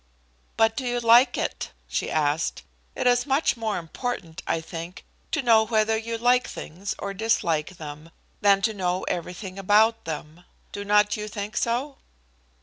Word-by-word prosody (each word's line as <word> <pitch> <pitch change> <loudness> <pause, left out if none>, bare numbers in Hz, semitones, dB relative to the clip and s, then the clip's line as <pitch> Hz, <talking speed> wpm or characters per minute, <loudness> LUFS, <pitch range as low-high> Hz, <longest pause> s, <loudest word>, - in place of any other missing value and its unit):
"But 225 0 +4
do 265 - -3
you 245 -1 -1
like 240 +2 +6
it?" - - -3
she - - -2
asked. 155 0 0 0.3
"It - - -2
is 245 +1 +3
much 275 0 +2
more 225 -2 -2
important, 170 -1 -5
I - - +1
think, 165 +2 -8 0.3
to 310 - 0
know 230 -3 +6
whether 220 0 +2
you 230 +1 -3
like 245 +2 +3
things 190 +6 -6
or 200 0 -4
dislike 185 -6 0
them, 150 +1 -9 0.3
than 200 -1 +4
to 220 - +2
know 185 -2 -1
everything 185 +2 -4
about 215 +4 +3
them. 160 +1 -6 0.3
Do 205 - -5
not 210 +1 +3
you 210 0 -4
think 205 0 -6
so?" 255 +4 -1
210 Hz, 160 wpm, -25 LUFS, 175-230 Hz, 0.3 s, like